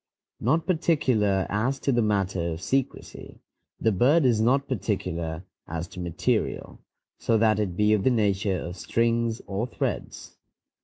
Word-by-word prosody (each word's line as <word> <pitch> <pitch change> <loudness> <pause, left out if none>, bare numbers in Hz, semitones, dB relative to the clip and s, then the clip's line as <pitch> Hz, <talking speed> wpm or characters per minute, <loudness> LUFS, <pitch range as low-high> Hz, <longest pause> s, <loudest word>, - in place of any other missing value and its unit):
Not 155 +8 +1
particular 130 - +1
as 120 +7 0
to 140 - +1
the 120 -2 +2
matter 95 -5 0
of 80 - -7
secrecy, 135 -1 -3 0.4
the 110 - +2
bird 135 - +3
is 115 -4 +3
not 135 +5 +2
particular 90 -7 -3 0.2
as 85 +1 -4
to 90 - -10
material, 85 -2 -2 0.4
so 115 - +2
that 110 -1 +3
it 95 -4 -2
be 105 0 +4
of 105 -3 +1
the - - +4
nature 100 -5 +1
of 90 +2 -6
strings 115 +3 0
or 100 +5 -2
threads. 125 - -5
110 Hz, 150 wpm, -26 LUFS, 95-125 Hz, 0.4 s, be